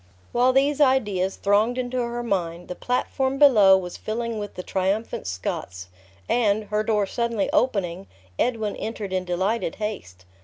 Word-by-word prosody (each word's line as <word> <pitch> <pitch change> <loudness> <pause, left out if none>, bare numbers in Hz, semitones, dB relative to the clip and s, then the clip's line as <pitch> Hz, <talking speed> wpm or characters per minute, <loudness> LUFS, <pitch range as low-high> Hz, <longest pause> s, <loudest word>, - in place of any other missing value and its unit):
While 250 +2 +3
these 280 +3 +2
ideas 205 -9 +2
thronged 210 +5 +2
into 255 0 -2
her 240 0 -2
mind, 175 -6 -2
the - - -3
platform 265 +3 -1
below 215 -10 +7
was 180 -2 -6
filling 230 0 -3
with 205 -1 -6
the 180 - -6
triumphant 195 - -2
Scots; 90 0 -5 0.4
and, 215 -3 +2
her 210 0 +1
door 215 -2 +1
suddenly 235 0 -1
opening, 195 -6 0 0.3
Edwin 220 -4 0
entered 215 -4 -5
in 185 -1 -1
delighted 185 +2 -1
haste. 95 - -6
210 Hz, 150 wpm, -24 LUFS, 190-240 Hz, 0.4 s, below